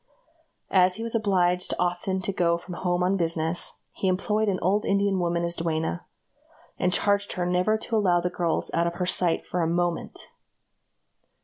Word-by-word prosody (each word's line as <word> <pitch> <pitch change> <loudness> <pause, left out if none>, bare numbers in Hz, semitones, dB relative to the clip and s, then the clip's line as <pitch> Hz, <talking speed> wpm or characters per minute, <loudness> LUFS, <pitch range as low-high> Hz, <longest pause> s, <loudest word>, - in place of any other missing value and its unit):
As 185 -1 +4
he 225 - -5
was 230 - -5
obliged 185 -5 +1
often 180 +2 -1
to 195 +2 -2
go 170 -2 +2
from 175 +1 -9
home 175 0 -1
on 190 +2 +2
business, 165 -1 -1 0.2
he 190 - -3
employed 210 +3 +1
an 190 - 0
old 200 +4 +1
Indian 200 -1 +1
woman 170 -1 0
as 170 0 -2
duenna, 160 - -2 0.7
and 180 - +1
charged 200 +2 +1
her 180 - -2
never 180 +5 +2
to 225 +1 -2
allow 180 -4 +3
the 180 +1 -2
girls 170 -2 -1
out 170 0 +2
of 170 - -3
her 180 0 -2
sight 180 -2 +2
for 180 - -2
a 165 - +1
moment. 175 0 -2
180 Hz, 180 wpm, -26 LUFS, 170-195 Hz, 0.7 s, As